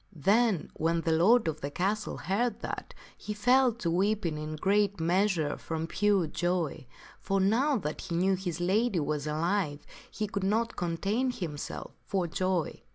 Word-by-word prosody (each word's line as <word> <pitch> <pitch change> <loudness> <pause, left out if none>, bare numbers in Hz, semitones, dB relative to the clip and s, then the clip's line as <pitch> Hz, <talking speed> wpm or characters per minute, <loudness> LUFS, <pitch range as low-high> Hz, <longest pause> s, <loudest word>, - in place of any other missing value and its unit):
Then 200 - +2
when 165 +1 0
the 165 - 0
lord 195 +7 +4
of 155 -1 -2
the 140 - -3
castle 200 +8 -1
heard 230 +6 -1
that, - - -6 0.2
he 210 - -6
fell 250 +4 +4
to 185 -7 -2
weeping 190 -2 +1
in 155 0 -5
great 200 +3 +1
measure 170 -2 +1
from 160 0 -4
pure 200 +1 +2
joy; 175 -5 -2 0.3
for 195 0 0
now 240 +9 +3
that 155 -7 -4
he 170 - -4
knew 190 +3 +3
his 180 -3 -3
lady 195 +3 +2
was 150 0 -2
alive 155 -1 -1 0.2
he 215 - -3
could 200 -1 -3
not 225 +4 +1
contain 195 +9 -1
himself 165 -11 -5
for 190 -3 -1
joy. 180 0 -1
185 Hz, 160 wpm, -29 LUFS, 165-210 Hz, 0.3 s, lord